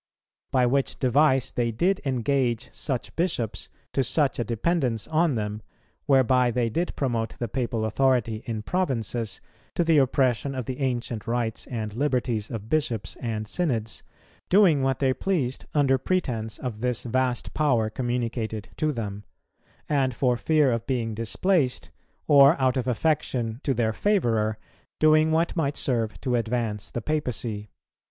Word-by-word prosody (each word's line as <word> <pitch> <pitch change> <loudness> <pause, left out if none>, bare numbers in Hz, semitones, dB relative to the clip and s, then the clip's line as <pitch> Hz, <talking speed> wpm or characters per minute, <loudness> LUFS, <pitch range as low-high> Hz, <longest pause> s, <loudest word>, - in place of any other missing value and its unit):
By 130 -2 +3
which 135 +2 0
device 135 0 +3
they 120 -1 0
did 180 - +1
engage 130 -2 0
such 130 -5 -4
bishops 115 - -2 0.2
to 135 - +2
such 140 +2 +1
a - - +2
dependence 120 0 -1
on 160 -2 +2
them, 105 -1 -3 0.5
whereby 130 -2 +4
they 120 -1 0
did 170 +9 -2
promote 115 -5 -2
the 120 - -2
papal 115 -1 -2
authority 115 -2 +1
in 110 -2 -3
provinces, 115 - -2 0.3
to 175 - +2
the 160 -2 +4
oppression 135 0 +1
of 130 -3 -3
the 130 +3 -5
ancient 120 -4 -2
rights 115 -1 -2
and 110 -4 -4
liberties 125 -4 -1
of 110 -3 -6
bishops 120 -8 -1
and 110 -3 -3
synods, 115 -9 -1 0.5
doing 180 -7 +5
what 135 -1 +1
they 130 -2 +2
pleased 140 -7 -1
under 135 -3 +3
pretence 120 -10 -1
of 120 -5 -5
this 125 -1 0
vast 125 0 -1
power 120 -8 +2
communicated 115 -3 -3
to 155 0 +1
them; 105 -5 -5 0.6
and 135 -4 +1
for 125 -1 +2
fear 150 +1 +3
of 115 -1 -2
being 120 -4 -1
displaced, 130 - 0 0.3
or 140 +1 +6
out 130 -1 +2
of 130 -1 -1
affection 125 -3 0
to 140 - -1
their 110 -1 +1
favourer, 115 - +1 0.4
doing 155 0 +5
what 165 +3 +1
might 145 -4 0
serve 115 -5 -1
to 130 -2 -1
advance 115 -2 -1
the 120 - -5
papacy. 120 -8 -2
125 Hz, 150 wpm, -26 LUFS, 115-140 Hz, 0.6 s, or